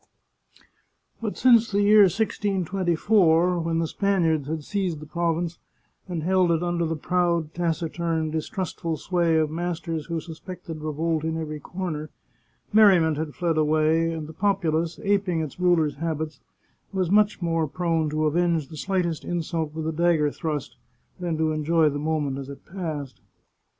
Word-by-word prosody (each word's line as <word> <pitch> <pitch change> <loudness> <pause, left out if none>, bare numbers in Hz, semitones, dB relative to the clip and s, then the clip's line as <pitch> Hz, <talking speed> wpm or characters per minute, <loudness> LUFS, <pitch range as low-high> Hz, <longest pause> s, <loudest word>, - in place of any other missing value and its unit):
But 215 -3 -3
since 235 -3 +5
the 205 0 +1
year 210 0 +7
1624, 180 -3 +2
when 165 0 -1
the 165 - +1
Spaniards 165 -6 +1
had 155 0 -3
seized 185 -3 -2
the 155 - -9
province, 170 +1 -2 0.5
and 170 -4 -3
held 185 0 +3
it 165 +1 +1
under 175 -1 0
the 165 - -1
proud, 170 -1 0
taciturn, 165 -1 -1
distrustful 165 0 -3
sway 170 -2 +1
of 155 -1 +1
masters 165 -1 -3
who 170 -1 -2
suspected 165 0 -8
revolt 155 +1 -1
in 160 0 -1
every 155 -2 -4
corner, 155 -2 -5 0.6
merriment 185 -8 +5
had 155 -1 -4
fled 165 -3 0
away, 155 +2 +2
and 160 -2 -4
the 160 - -10
populace, 170 -3 0
aping 195 -5 +1
its 155 +1 -6
rulers' 170 -5 +2
habits, 155 -2 -3 0.5
was 185 -3 -1
much 210 +1 +4
more 165 -2 0
prone 165 -1 0
to 155 +1 0
avenge 165 -1 +1
the 155 - -9
slightest 170 -1 -1
insult 165 -1 -2
with 160 -1 -3
a - - 0
dagger 160 -2 +2
thrust, 145 -6 -4 0.4
than 170 -3 -2
to 160 0 +1
enjoy 155 +1 +2
the 145 0 -3
moment 150 -3 -1
as 135 0 -7
it 140 - -10
passed. 155 - -5
165 Hz, 155 wpm, -25 LUFS, 155-180 Hz, 0.6 s, year